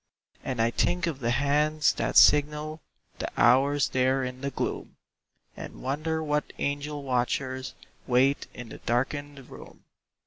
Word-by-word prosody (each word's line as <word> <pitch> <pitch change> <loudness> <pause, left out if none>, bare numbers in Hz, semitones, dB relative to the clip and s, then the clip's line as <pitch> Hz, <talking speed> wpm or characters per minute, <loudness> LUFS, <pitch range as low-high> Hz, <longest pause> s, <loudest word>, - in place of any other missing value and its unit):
And 130 -3 -4
I 115 +1 +2
think 175 +7 0
of 160 -5 -3
the 120 -3 -1
hands 150 +4 +2
that - - -1
signal 150 +1 +4 0.4
The - - -3
hours 135 +4 +4
there 130 +1 +1
in 125 0 -6
the 140 - -2
gloom, - - -4 0.6
And - - -9
wonder 155 +4 -2
what 150 -1 -2
angel 145 +1 -3
watchers 130 +1 -2 0.3
Wait 130 +3 +2
in 125 -2 -10
the - - -10
darkened 140 +3 -3
room. - - -13
140 Hz, 140 wpm, -27 LUFS, 130-150 Hz, 0.6 s, signal